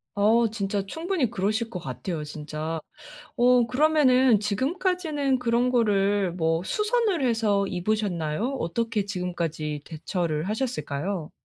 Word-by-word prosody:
어 225 Hz, +3 st, +4 dB
진짜 200 Hz, -2 st, -2 dB
충분히 320 Hz, -, -1 dB
그러실 215 Hz, +2 st, -1 dB
것 180 Hz, -6 st, -5 dB
같아요 150 Hz, +3 st, -5 dB
진짜. 155 Hz, +2 st, -5 dB, 0.6 s
어 245 Hz, -1 st, +5 dB
그러면은 260 Hz, -4 st, +4 dB
지금까지는 290 Hz, -, 0 dB
그런 245 Hz, +1 st, +1 dB
거를 205 Hz, -5 st, +2 dB
뭐 165 Hz, -1 st, 0 dB
수선을 425 Hz, -, +1 dB
해서 215 Hz, -4 st, +2 dB
입으셨나요? 190 Hz, -, -1 dB
어떻게 215 Hz, +4 st, -1 dB
지금까지 170 Hz, -6 st, -3 dB
대처를 160 Hz, -1 st, -3 dB
하셨을까요? 200 Hz, -, -3 dB
210 Hz, 290 characters per minute, -26 LUFS, 175-250 Hz, 0.6 s, 어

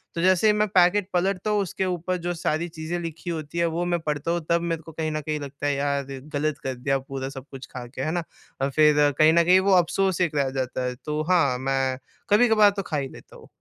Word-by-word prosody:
तो 170 Hz, -, -1 dB
जैसे 185 Hz, +3 st, +4 dB
ही 210 Hz, -, +5 dB
मैं 210 Hz, 0 st, +1 dB
पैकेट 185 Hz, +1 st, +3 dB
पलटता 190 Hz, +3 st, 0 dB
हूँ 210 Hz, -1 st, +2 dB
उसके 190 Hz, 0 st, -2 dB
ऊपर 180 Hz, 0 st, -2 dB
जो 175 Hz, -, 0 dB
सारी 165 Hz, 0 st, -1 dB
चीज़ें 160 Hz, +1 st, -4 dB
लिखी 165 Hz, +1 st, -6 dB
होती 160 Hz, -1 st, -5 dB
है 170 Hz, -, +2 dB
वो 175 Hz, -, 0 dB
मैं 175 Hz, -1 st, 0 dB
पढ़ता 150 Hz, 0 st, -2 dB
हूँ 170 Hz, 0 st, 0 dB
तब 170 Hz, 0 st, +3 dB
मेरे 165 Hz, -1 st, -2 dB
को 160 Hz, -, -12 dB
कहीं 160 Hz, 0 st, -3 dB
न 155 Hz, 0 st, -2 dB
कहीं 150 Hz, +1 st, -3 dB
लगता 140 Hz, 0 st, -7 dB
है 145 Hz, -, +2 dB
यार, 140 Hz, 0 st, 0 dB, 0.3 s
गलत 150 Hz, 0 st, -1 dB
कर 135 Hz, -, -2 dB
दिया 135 Hz, +2 st, 0 dB
पूरा 135 Hz, 0 st, -6 dB
सब 135 Hz, -1 st, -9 dB
कुछ 135 Hz, -1 st, -8 dB
खा 125 Hz, -1 st, -6 dB
के, 125 Hz, -, -7 dB
है 155 Hz, -, -1 dB
ना? 175 Hz, 0 st, -1 dB, 0.4 s
और 135 Hz, -, +1 dB
फ़िर 150 Hz, 0 st, +4 dB
कहीं 155 Hz, +1 st, +6 dB
न 170 Hz, 0 st, +5 dB
कहीं 180 Hz, +2 st, +5 dB
वो -, -, +5 dB
अफ़सोस 185 Hz, +2 st, 0 dB
एक 165 Hz, -4 st, +1 dB
रह 140 Hz, -2 st, +1 dB
जाता 130 Hz, 0 st, -2 dB
है। 125 Hz, 0 st, -3 dB
तो 150 Hz, 0 st, -1 dB
हाँ, 140 Hz, -8 st, +3 dB
मैं 135 Hz, 0 st, 0 dB, 0.3 s
कभी-कभार 215 Hz, -1 st, +5 dB
तो -, -, 0 dB
खा 150 Hz, -, +1 dB
ही 135 Hz, -2 st, -3 dB
लेता -, -, -14 dB
हूँ। -, -, -14 dB
160 Hz, 255 wpm, -25 LUFS, 140-175 Hz, 0.4 s, कहीं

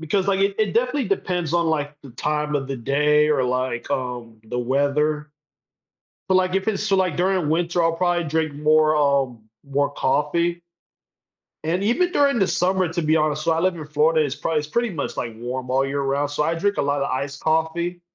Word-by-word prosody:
because, 185 Hz, +5 st, 0 dB
like, 195 Hz, -1 st, +1 dB
it 195 Hz, 0 st, +2 dB
it 215 Hz, -2 st, 0 dB
definitely 250 Hz, 0 st, +1 dB
depends 180 Hz, -5 st, -1 dB
on, 170 Hz, -1 st, +2 dB
like, 150 Hz, -2 st, -1 dB
the 135 Hz, -, -11 dB
time 150 Hz, +4 st, -2 dB
of 135 Hz, -2 st, -1 dB
the 135 Hz, 0 st, -4 dB
day 150 Hz, +4 st, +2 dB
or, 140 Hz, -4 st, +2 dB
like, 125 Hz, 0 st, -2 dB
um, 125 Hz, -4 st, -4 dB
the 115 Hz, +2 st, -4 dB
weather, 145 Hz, +4 st, 0 dB, 1.0 s
but, 190 Hz, -, +2 dB
like, 185 Hz, 0 st, +2 dB
if 195 Hz, +1 st, 0 dB
it's 205 Hz, -2 st, -1 dB
still, 195 Hz, -3 st, +2 dB
like, 185 Hz, -5 st, 0 dB
during 185 Hz, -3 st, +1 dB
winter, 170 Hz, +2 st, +1 dB
I'll 165 Hz, 0 st, +2 dB
probably 175 Hz, 0 st, 0 dB
drink 155 Hz, -1 st, -1 dB
more, 155 Hz, +1 st, +3 dB
um, 140 Hz, -5 st, +1 dB, 0.3 s
more 140 Hz, +1 st, +1 dB
coffee 170 Hz, +5 st, 0 dB, 1.0 s
and 170 Hz, +4 st, 0 dB
even 350 Hz, -, +1 dB
during 280 Hz, -3 st, +3 dB
the 195 Hz, -, +3 dB
summer, 185 Hz, +1 st, +1 dB
to 170 Hz, +1 st, -2 dB
be 155 Hz, +1 st, +2 dB
honest, 155 Hz, -1 st, 0 dB
so 165 Hz, -, +2 dB
I 160 Hz, -, 0 dB
live 185 Hz, +2 st, +1 dB
in 160 Hz, -3 st, -7 dB
Florida, 155 Hz, +1 st, +2 dB
it's 145 Hz, -1 st, -3 dB
probably 160 Hz, -2 st, 0 dB
it's 150 Hz, -, -8 dB
pretty 235 Hz, +6 st, 0 dB
much, 160 Hz, -5 st, -4 dB
like, 115 Hz, -2 st, -4 dB
warm 125 Hz, +2 st, -5 dB
all 135 Hz, +1 st, +2 dB
year 140 Hz, +1 st, -2 dB
round, 140 Hz, +1 st, 0 dB
so 145 Hz, +1 st, 0 dB
I 165 Hz, +2 st, 0 dB
drink 200 Hz, +5 st, 0 dB
a -, -, +1 dB
lotta 140 Hz, 0 st, 0 dB
iced 140 Hz, +2 st, -3 dB
coffee 160 Hz, +2 st, 0 dB
155 Hz, 210 wpm, -22 LUFS, 140-175 Hz, 1.0 s, more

